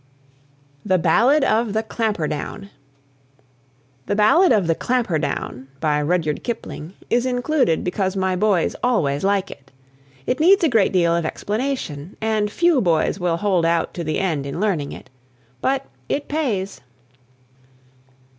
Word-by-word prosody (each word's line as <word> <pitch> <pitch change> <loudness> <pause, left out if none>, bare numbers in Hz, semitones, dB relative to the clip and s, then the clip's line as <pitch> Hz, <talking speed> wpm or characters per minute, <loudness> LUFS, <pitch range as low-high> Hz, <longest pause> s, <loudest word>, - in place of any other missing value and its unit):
THE 190 -2 +2
BALLAD 235 - +3
OF 225 -4 +1
THE 220 +1 0
"CLAMPHERDOWN." 200 -4 -3 1.4
"The 205 - 0
Ballad 275 - +5
of 210 -6 +3
the 165 - +2
Clampherdown," 160 - -2
by 150 -1 +1
Rudyard 155 -1 -1
Kipling, 195 -8 -6 0.2
is 240 +2 +2
included 250 - +1
because 190 +1 -1
my 190 -1 0
boys 190 -2 +1
always 150 - +1
like 195 -1 +1
it. 135 -1 -14 0.5
It 255 - -1
needs 365 +4 +5
a 325 - +4
great 225 -6 +3
deal 170 -2 +2
of 170 - 0
explanation, 205 - -3
and 215 -1 0
few 340 +3 +2
boys 170 0 +1
will 175 -2 0
hold 190 -3 +1
out 165 0 +1
to 175 - -4
the 155 -1 -2
end 160 -7 -1
in 140 - -5
learning 185 -9 -1
it. - - -11 0.5
But 270 +1 0 0.2
"it 285 - -2
pays." 230 -11 -2
195 Hz, 140 wpm, -21 LUFS, 165-240 Hz, 1.4 s, Ballad